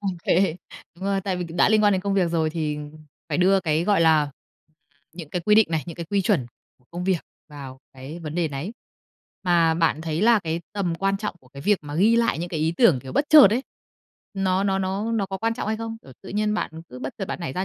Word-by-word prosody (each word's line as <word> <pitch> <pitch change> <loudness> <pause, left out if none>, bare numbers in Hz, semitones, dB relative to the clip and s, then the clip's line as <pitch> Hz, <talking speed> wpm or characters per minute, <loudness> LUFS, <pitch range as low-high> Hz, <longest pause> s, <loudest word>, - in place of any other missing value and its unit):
OK. 190 -4 -5 0.7
Đúng 185 +3 -9
rồi, 195 -1 0
tại 190 -1 -2
vì 180 - -3
c 165 - -10
đã - - +5
liên 215 -1 +3
quan 205 -1 +5
đến 190 - +1
công 200 -1 -1
việc 180 -4 +2
rồi 160 -2 0
thì 155 -2 -3 0.5
phải - - -1
đưa 190 +1 +4
cái, 160 0 0
gọi 200 -3 +2
là, 160 -2 +5
ừm, 145 - -5 0.8
những 165 -4 -9
cái 180 - -2
quy 210 - +4
định 220 0 +6
này, 160 -2 0
những 170 - -7
cái 170 -1 -6
quy 200 -1 +1
chuẩn 180 - +1 0.3
của 125 - -32
công 175 +1 -5
việc 185 -3 +1 0.3
vào 135 -3 -10
cái 135 +5 -9
vấn 155 0 -6
đề 170 -3 0
nấy. 145 +9 -5 0.7
Mà 170 -2 +3
bạn 165 -2 +1
thấy 160 +2 -2
là 230 0 +5
cái 165 0 -3
tầm 195 -5 -1
quan 195 +3 0
trọng 210 -1 -4
của 130 - -22
cái 140 +1 -11
việc 205 +1 +2
mà 145 -1 -7
ghi 210 +8 +4
lại 230 -7 +1
những 175 +1 -4
cái 160 -3 -3
ý 160 +1 +1
tưởng, 195 - +4
kiểu, 130 +1 -9
bất 285 - +2
chợt 300 -6 +10
ấy, 245 +5 0 0.7
nó 190 0 0
nó 195 -1 +1
nó 195 +4 -2
nó 205 -4 0
có 190 0 -5
quan 225 +2 -1
trọng 215 - -4
hay 220 - 0
không? 225 0 -5
Ừ, 130 - -14
tự 195 - -11
nhiên 210 +1 0
bạn - - -2 0.2
cứ 125 - -10
bất 130 +1 -6
chợt 195 - -3
bạn - - -4
nảy 160 -6 -4
ra 185 +1 -2
180 Hz, 265 wpm, -24 LUFS, 160-200 Hz, 0.8 s, chợt